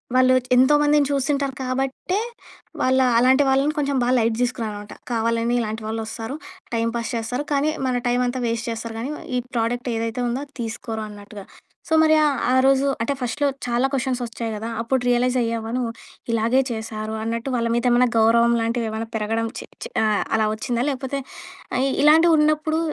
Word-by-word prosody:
వాళ్ళు 255 0 +5 0.2
ఎంతోమందిని 295 +2 +4
చూసుంటారు 275 0 0
కాబట్టే, 265 +8 -2 0.6
వాళ్ళ 260 +1 +3 0.2
అలాంటి 260 +3 +5
వాళ్ళని 275 +3 +2
కొంచెం 280 -1 0
బా 245 - +1
లైట్ 225 -1 +2
తీసుకున్నానమాట. 215 -4 -3 0.2
కావాలని 230 +1 0
ఇలాంటి 220 0 -4
వాళ్ళు 225 +1 -3
వస్తారు, 225 +4 -5 0.4
టైం 230 0 +1
పాస్ 235 -1 -3
చేస్తారు, 240 +5 -2
కానీ 285 +2 +2 0.2
మన 250 -1 +1
టైమ్ 245 +1 +2
అంతా 245 +1 -2
వేస్ట్ 230 0 -2
చేస్తారు 230 0 -5
కానీ, 255 +5 -3 0.3
ఈ - - +2 0.2
ప్రోడక్ట్ 240 +1 -1
ఏదైతే 230 +2 -2
ఉందో 240 +3 -2
అది 285 - -28
తీసుకోరు 225 0 -5
అన్నట్టుగా. 205 -1 -11 0.4
సో, 320 - +1
మరి 315 0 +5
ఆ - - +4 0.2
ఆ - - +3
రోజు 270 0 +4 0.2
అంటే 230 +5 0
ఫస్ట్‌లో 285 +4 0 0.2
చాలా 245 +3 +2
కొషన్స్ 260 -1 -1
వచ్చాయి 230 -1 -5
కదా! 225 +2 -5
అప్పుడు 260 +3 0
రియలైజ్ 250 +1 +2
అయ్యావా 230 -1 -2
నువ్వు. 240 -2 -1 0.4
ఇలాగే 230 +4 +3
చేశారు 220 -1 -4
అన్నట్టు, 230 +3 -3
వాళ్ళ 230 -1 0
మీద 235 - 0
ఏమైనా 245 +1 +4
గౌరవం 235 +1 +4
లాంటివి 230 0 -1
ఏమన్నా 225 +1 -4
పెరగడం, 225 +1 -1
చి, - - -8 0.2
చి - - -6
ఆహ్, 215 -2 +2
అలా 215 -1 +2
వచ్చిందా 240 +2 -2
లేపోతే 270 +1 -3 0.6
ఆహ్, 265 +2 +2
ఇలాంటివి 320 +3 +6
ఉన్నప్పుడు 305 +1 +2
240 Hz, 175 wpm, -22 LUFS, 225-270 Hz, 0.6 s, ఇలాంటివి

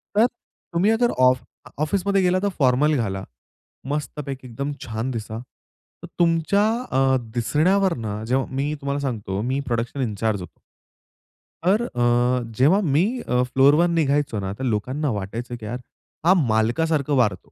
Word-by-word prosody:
तर 215 +3 +6 0.5
तुम्ही 185 +6 +3
जर 240 - +4 0.2
आफ 125 -1 -1 0.4
ऑफिसमध्ये 195 +4 +1
गेला, 185 0 +2
तर 200 - +2
फॉर्मल 140 +3 +3
घाला. 95 -5 -2 0.7
मस्तपैकी 140 -2 -4
एकदम 140 +4 -4
छान 115 +3 -3
दिसा. 110 -2 -5 0.7
तर - - -7
तुमच्या 165 +4 +3 0.3
अ, 130 0 +3 0.2
दिसण्यावरनं 145 - +1
जेव्हा 130 +3 +1
मी 145 +2 -1
तुम्हाला 140 +1 -2
सांगतो, 105 -7 -3
मी 130 +4 -1
प्रोडक्शन 120 +3 -2
इंचार्ज 110 -3 -1
होतो. 90 - -11 1.0
तर 195 +6 +3
अ, 120 - +1 0.2
जेव्हा 150 +10 +5
अ, - - +2
मी 155 -1 +3 0.3
फ्लोरवर 135 +6 +4
निघायचो 145 -7 +1
ना, 95 0 -3
तर 130 - -4
लोकांना 130 +6 -1
वाटायचं 115 +4 -4
की 115 - -11
यार 120 +4 -4 0.5
हा 185 - +7
मालकासारखा 140 - +1
वार 120 -6 +3
अ, - - -7
130 Hz, 145 wpm, -23 LUFS, 115-155 Hz, 1.0 s, हा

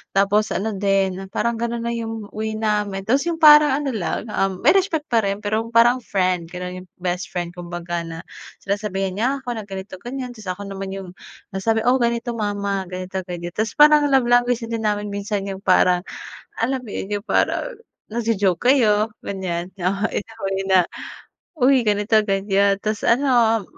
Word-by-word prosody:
tapos 205 +2 +3
ano 205 +5 -1
din, 195 -1 0
parang 235 -1 0
ganun 235 0 -2
na 235 - -1
yung 225 -2 -5
way 220 0 -3
namin. 210 -3 -1
Tapos 265 +8 +2
yung 330 -1 -2
parang 300 -2 +8
ano 275 - -1
lang, 215 +2 -3
ah, 195 - +1
may 185 -1 +1
respect 360 -6 +1
pa 230 - +4
rin 200 +1 -2
pero 215 +2 0
parang 240 +2 +5
friend 180 -4 0
ganon, 180 0 -6
yung - - -34
best 180 0 -2
friend 175 -1 -2
kumbaga, 175 0 -4
na 165 0 -7 0.4
sinasabihan 195 -2 -2
niya 230 - +1
ako 250 - -7
na 215 - -5
ganito 190 0 -7
ganyan, 255 +1 -5
tapos 210 -3 -8
ako 200 - -7
naman 195 0 -5
yung 195 -2 -7 0.4
nasabi, 220 +4 0
oo, 255 +2 +4
ganito 235 +1 0
mama 200 -2 -2
ganito 185 +1 -5
ganyan. 175 -1 -5
Tapos 220 +1 -1
parang 300 0 +7
love 260 -3 +4
language 245 0 +3
din 230 -1 -3
namin 210 0 -1
minsan 200 0 -3
yung 190 -1 -5
parang 180 -1 +4 0.6
alam 260 +4 +1
mo - - -10
yun, 195 - -4
yung - - -36
parang - - +1 0.4
nag-jo-joke 220 -2 +1
kayo 215 -5 +4 0.2
ganyan 185 -2 -4 0.4
in - - 0
a 225 0 -15
way 195 0 -1
na, 185 -2 +5 0.7
uy 265 0 +5
ganito 210 +1 +3
ganyan 195 0 +2
tas 215 -1 -1
ano 235 -4 +3
205 Hz, 175 wpm, -21 LUFS, 190-235 Hz, 0.7 s, parang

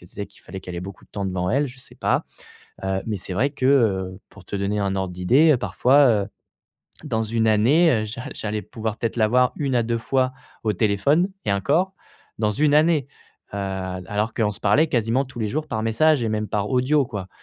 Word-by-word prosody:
qu'elle 90 - -16
se - - -20
disait 100 0 -5
qu'il - - -20
fallait 95 - -8
qu'elle 90 -1 -7
ait - - -3
beaucoup 95 +1 -9
de - - -32
temps 100 -1 -3
devant 90 -1 -1
elle, 140 +4 +2
je 125 +1 -13
sais - - -12
pas, - - 0 0.6
heu, 95 0 0
mais 110 -2 -2
c'est 90 +1 -6
vrai 130 +9 +1
que, 135 -2 -2
heu, 95 -9 +2
pour 100 - -15
te 100 - -5
donner 100 +1 -1
un 100 -1 -1
ordre 95 -2 -2
d'idée, 130 - +4
parfois, 135 +3 +4
heu, 105 -3 +1 0.8
dans 115 -7 -1
1 110 +1 0
année, 130 +11 +4
heu, - - -3
j'a 115 +4 -7
j'allais 105 0 -3
pouvoir 110 +2 -5
peut-être 115 0 -2
l'avoir 125 +3 +3
1 140 -3 -1
à 120 - +3
2 115 +1 -1
fois 130 +2 0 0.3
au 110 - +2
téléphone 140 - +2 0.2
et 100 - +2
encore 155 - +1 0.4
dans 105 -1 +1
1 145 +5 +2
année, 155 -2 +3 0.5
heu, - - -3
alors 95 +2 -3
qu'on 110 -3 +1
se - - -11
parlait 105 +11 +4
quasiment 120 +1 +1
tous 130 -1 -11
les 110 - 0
jours 150 +7 -2
par 110 -4 -2
message 140 +5 +3
et - - 0
même 105 0 -2
par 105 -1 -1
audio, 135 +2 +2
quoi. 100 -5 -6
110 Hz, 225 wpm, -23 LUFS, 100-135 Hz, 0.8 s, d'idée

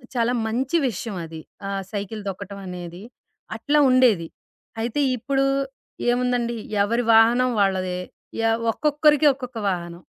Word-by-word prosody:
చాలా 240 +1 +2
మంచి 260 +8 0
విషయవది. 175 -7 -5 0.3
ఆ - - -3 0.2
సైకిల్ 205 +1 -4
తొక్కటవనేది, 185 -2 -7 0.6
అట్లా 290 +6 +2
ఉండేది. 240 -10 +4 0.5
అయితే 240 +5 -1 0.2
ఇప్పుడూ 270 +3 0 0.7
ఏముందండి, 245 -1 0 0.3
ఎవరి 235 +4 0
వాహనం 240 +3 +5
వాళ్ళదే 185 -2 0 0.5
ఎవ్ 225 +1 0
ఒక్కొక్కరికి 300 +2 +3
ఒక్కొక్క 250 -3 -8
వాహనం. 175 -1 -4
225 Hz, 105 wpm, -23 LUFS, 190-255 Hz, 0.7 s, వాహనం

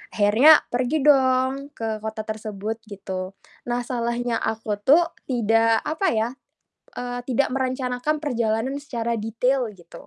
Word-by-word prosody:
Akhirnya 230 +9 +6
pergi 255 +4 0
dong 270 0 +3
ke 220 -1 -3
kota 220 0 -5
tersebut 215 0 -5
gitu. 190 -2 -6 0.3
Nah 245 0 -1
salahnya 235 -1 -2
aku 220 -2 -3
tuh 330 +10 +4 0.2
tidak 225 -2 +2
apa 320 +6 -1
ya, 220 +1 +1 0.7
eee, 245 0 -4
tidak 265 +2 +1
merencanakan 260 +3 -1
perjalanan 240 -1 -1
secara 235 -5 -3
detail 240 +4 0
gitu. 175 -3 -14
240 Hz, 125 wpm, -23 LUFS, 220-265 Hz, 0.7 s, Akhirnya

